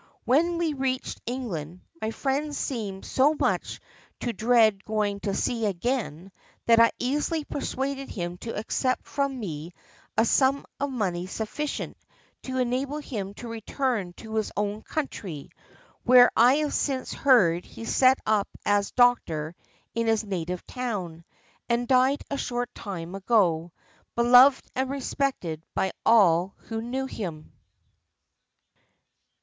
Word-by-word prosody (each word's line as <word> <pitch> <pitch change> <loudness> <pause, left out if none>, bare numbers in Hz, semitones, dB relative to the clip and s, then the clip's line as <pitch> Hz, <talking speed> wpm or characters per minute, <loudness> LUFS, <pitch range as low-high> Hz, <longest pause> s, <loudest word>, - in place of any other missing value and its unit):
When 335 +7 +3
we 335 -3 0
reached 265 -2 -2
England 185 - -4 0.2
my 220 - -1
friend 280 +5 -2
seemed 210 -9 -4
so 290 +4 +3
much - - 0 0.4
to 240 - -2
dread 220 -2 +3
going 210 -2 -1
to 200 -1 -2
sea 230 -3 0
again 195 - -2 0.3
that 230 -1 +6
I 230 0 +7
easily 295 +5 -1
persuaded 275 0 -3
him 175 -2 -5
to 230 - -5
accept 255 +4 -1
from 275 -2 -2
me 165 -5 -6 0.4
a 225 - +5
sum 270 +3 +3
of 280 +1 -1
money 185 -8 -2
sufficient 225 +9 -4 0.4
to 260 0 -4
enable 260 +3 -1
him 205 -9 -5
to 240 - -8
return 230 -3 -2
to 220 +4 -10
his 215 - -1
own 205 +1 -1
country, 195 - -5 0.5
where 250 0 +7
I 245 +4 +6
have 300 -1 0
since 265 -3 -1
heard 185 -11 +4
he 230 - -10
set 260 +2 +4
up 215 -2 +2 0.2
as 205 -1 +2
doctor 170 -11 +2 0.4
in 230 0 -1
his 225 0 +2
native 180 -3 -4
town, 190 -10 -4 0.4
and 240 +1 +1
died 260 +2 +3
a 280 - -1
short 245 -1 -3
time 180 -4 -6
ago, 185 -5 +2 0.4
beloved 250 +3 +6
and 260 0 -1
respected 265 - -2
by 190 - +1
all 190 -5 +4
who 225 -1 -5
knew 255 +3 -3
him." 175 -11 -6
230 Hz, 135 wpm, -26 LUFS, 195-265 Hz, 0.5 s, I